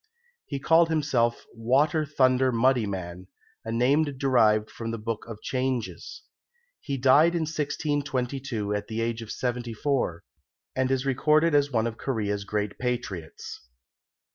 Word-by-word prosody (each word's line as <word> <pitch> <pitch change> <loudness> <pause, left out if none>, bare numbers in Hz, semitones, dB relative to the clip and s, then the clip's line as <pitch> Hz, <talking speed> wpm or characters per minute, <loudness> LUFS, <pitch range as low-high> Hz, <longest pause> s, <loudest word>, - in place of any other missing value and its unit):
He 140 - -3
called 165 +3 +4
himself 135 -7 +1
"Water 145 +7 +1
thunder 130 -2 +3
Muddy 120 -1 +2
man," 90 -1 -6 0.4
a 115 - -5
name 130 +7 +3
derived 125 -7 +2
from 115 -1 -6
the 115 - -3
Book 115 0 -4
of 115 -2 -8
Changes. 130 - -3 0.6
He 140 -1 -4
died 145 +6 +5
in 170 - 0
1622 140 -7 -2
at 105 0 -3
the 110 0 -4
age 115 0 -2
of 115 - -9
seventy 120 -2 -3
four, 125 - -1 0.5
and 130 0 +1
is 135 0 0
recorded 155 +4 +3
as 145 -1 +3
one 110 -3 +1
of 115 -1 -4
Korea's 105 -6 -2
great 105 0 -3
patriots. 120 -10 -4
125 Hz, 140 wpm, -26 LUFS, 115-140 Hz, 0.6 s, died